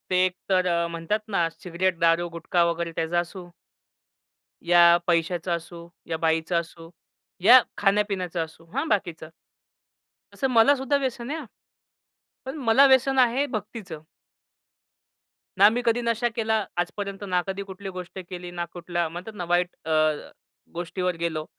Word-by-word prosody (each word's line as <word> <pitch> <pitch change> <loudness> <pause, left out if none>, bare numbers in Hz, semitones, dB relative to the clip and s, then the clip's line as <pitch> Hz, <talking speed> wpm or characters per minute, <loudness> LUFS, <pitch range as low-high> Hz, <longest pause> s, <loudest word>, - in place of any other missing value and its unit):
ते 185 0 +3
एक 185 - -1 0.2
तर 185 -1 +3
अ, 170 -1 +1
म्हणतात 170 +6 -2 0.2
ना 170 -2 +3
सिगारेट 180 0 -1
दारू, 170 0 +3
गुटखा 170 +1 0
वगैरे 170 0 -3
त्याचा 165 +1 0
असो 175 +1 -7 1.2
या 170 0 +7
पैशाचा 175 +1 0
असो, 170 0 -7 0.2
या 160 - -2
बाईचा 160 +1 +1
असो, 165 0 -6 0.5
या 245 +5 +9 0.2
खाण्यापिण्याचा 195 -4 0
असो. 160 +1 -13
हां, 275 +5 -1
बाकीचा. 175 -6 -1 1.1
तसं 270 - -1
मला 250 +4 +5
सुद्धा 270 +1 0
व्यसन 255 -3 -3
आहे 320 - -3
हं. 300 - -8 1.0
पण 265 +4 -5
मला 260 0 +5
व्यसन 265 0 +4
आहे 255 +3 +3
भक्तीचं. 205 -6 -7 1.6
ना 200 +1 +8
मी 235 +3 -1
कधी 235 +1 +2
नशा 235 0 0
केला 220 -2 0 0.3
आजपर्यंत, 200 +3 -5
ना 180 -3 0
कधी 195 +1 -3
कुठली 195 +1 -7
गोष्ट 185 0 -8
केली, 180 -1 -7
ना 175 -1 -3
कुठल्या 175 -1 -2
म्हणतात 180 +6 -8
ना 180 -3 -4
वाईट 175 +1 0
अ, 160 - -3 0.8
गोष्टीवर 175 +1 -2
गेलो. 160 -2 -2
180 Hz, 145 wpm, -25 LUFS, 170-220 Hz, 1.6 s, या